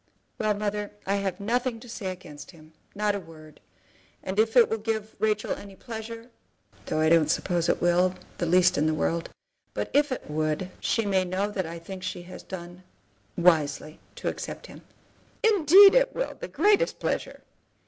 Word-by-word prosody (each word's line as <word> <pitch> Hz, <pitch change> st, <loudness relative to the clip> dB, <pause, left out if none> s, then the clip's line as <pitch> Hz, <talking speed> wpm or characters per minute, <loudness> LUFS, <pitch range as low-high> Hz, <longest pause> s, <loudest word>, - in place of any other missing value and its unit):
"Well, 215 Hz, -1 st, +1 dB
mother, 205 Hz, 0 st, -3 dB
I 200 Hz, +1 st, +1 dB
have 195 Hz, -2 st, -3 dB
nothing 240 Hz, +3 st, -1 dB
to 245 Hz, -, -13 dB
say 225 Hz, -4 st, -6 dB
against 175 Hz, -6 st, -8 dB
him, 160 Hz, -2 st, -16 dB, 0.2 s
not 210 Hz, 0 st, +1 dB
a 200 Hz, -, -2 dB
word. 155 Hz, -3 st, -14 dB, 0.6 s
And 190 Hz, +2 st, -3 dB
if 225 Hz, +3 st, +2 dB
it 240 Hz, -, +8 dB
will 220 Hz, -, -2 dB
give 220 Hz, 0 st, -3 dB
Rachel 215 Hz, -1 st, 0 dB
any 200 Hz, -1 st, -6 dB
pleasure, 230 Hz, +1 st, -8 dB, 0.6 s
though -, -, -1 dB
I 155 Hz, -, +3 dB
don't 160 Hz, -2 st, +4 dB
suppose 170 Hz, 0 st, 0 dB
it -, -, +1 dB
will, 180 Hz, +1 st, +3 dB, 0.2 s
the 175 Hz, -, 0 dB
least 180 Hz, -1 st, +4 dB
in 155 Hz, -, +2 dB
the 155 Hz, -, +1 dB
world; 165 Hz, +2 st, -1 dB, 0.5 s
but -, -, -3 dB
if 290 Hz, 0 st, +3 dB
it 260 Hz, -, -4 dB
would, 155 Hz, +4 st, -2 dB
she 225 Hz, -, 0 dB
may 190 Hz, -2 st, +2 dB
know 190 Hz, +3 st, -2 dB
that 190 Hz, -4 st, -2 dB
I 165 Hz, +1 st, -6 dB
think 185 Hz, +3 st, -9 dB
she 180 Hz, -1 st, -5 dB
has 180 Hz, -, -10 dB
done 175 Hz, -1 st, -9 dB, 0.6 s
wisely 155 Hz, -3 st, +2 dB, 0.2 s
to -, -, -5 dB
accept -, -, -5 dB
him." -, -, -12 dB, 0.6 s
"Indeed 395 Hz, -2 st, +8 dB
it -, -, +3 dB
will; -, -, -2 dB
the -, -, -8 dB
greatest 420 Hz, +4 st, +2 dB
pleasure." -, -, -3 dB
195 Hz, 180 wpm, -26 LUFS, 170-225 Hz, 0.6 s, it